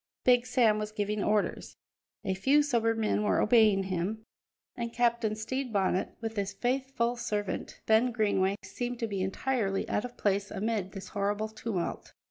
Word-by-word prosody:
Big 245 -1 +4
Sam 225 -3 +3
was 210 0 -4
giving 210 0 -1
orders; 210 -1 0 0.5
a 190 - +1
few 275 +10 +3
sober 230 -5 +1
men 215 -1 +1
were 210 - +2
obeying 215 -4 +5
him, 190 +4 -3 0.5
and 235 -1 -3
Captain 235 -2 +1
Stede 255 +4 -3
Bonnet, 190 -2 0
with 225 -1 -4
his 200 0 -1
faithful 250 -1 0
servant, 205 -4 -3
Ben 225 +3 +4
Greenway, 200 -4 +1
seemed 245 0 -4
to 230 - -2
be 200 -3 -3
entirely 195 +1 -1
out - - 0
of 245 0 -8
place 200 0 0
amid 205 -2 -2
this 195 -2 -8
horrible 205 +1 -1
tumult. 215 -4 -4
220 Hz, 160 wpm, -30 LUFS, 200-240 Hz, 0.5 s, obeying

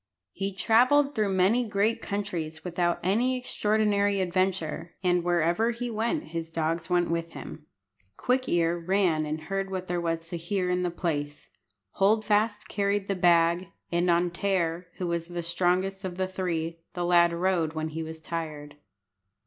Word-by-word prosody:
He 195 0 -3
travelled 255 +8 +4
through 210 -5 0
many 200 +7 +3
great 220 +1 0
countries 170 -6 -4
without 175 -1 0
any 240 +8 +2
extraordinary 210 -4 +1
adventure, 180 -3 -1
and 180 -1 +2
wherever 175 +5 +2
he 240 0 -3
went 235 +9 -1
his 165 -1 -4
dogs 165 +1 -2
went 175 -1 +2
with 170 0 -2
him. 150 -1 -9 0.5
Quick 255 +1 0
ear 170 0 +2
ran 170 -3 +1
and 155 +1 -3
heard 195 +3 -3
what 185 -1 -4
there 175 -1 -2
was 165 -1 -2
to 175 - -3
hear 180 +2 -1
in 180 0 +1
the 180 - 0
place; 145 -4 -3 0.4
Hold 215 +2 +2
fast 210 0 +1
carried 200 0 0
the 195 - +1
bag; 170 0 +3 0.2
and 175 +1 +1
on 175 +1 +3
Tear, 175 -2 -1
who 185 - -4
was 170 -1 -2
the 175 -1 -4
strongest 180 +3 0
of 180 -2 -5
the 185 0 0
three, 170 -3 -3 0.2
the 175 -1 -1
lad 175 -1 +5
rode 170 -2 0
when 155 0 -3
he 160 +1 -5
was 160 0 -6
tired. 155 -3 -6
180 Hz, 165 wpm, -27 LUFS, 170-200 Hz, 0.5 s, lad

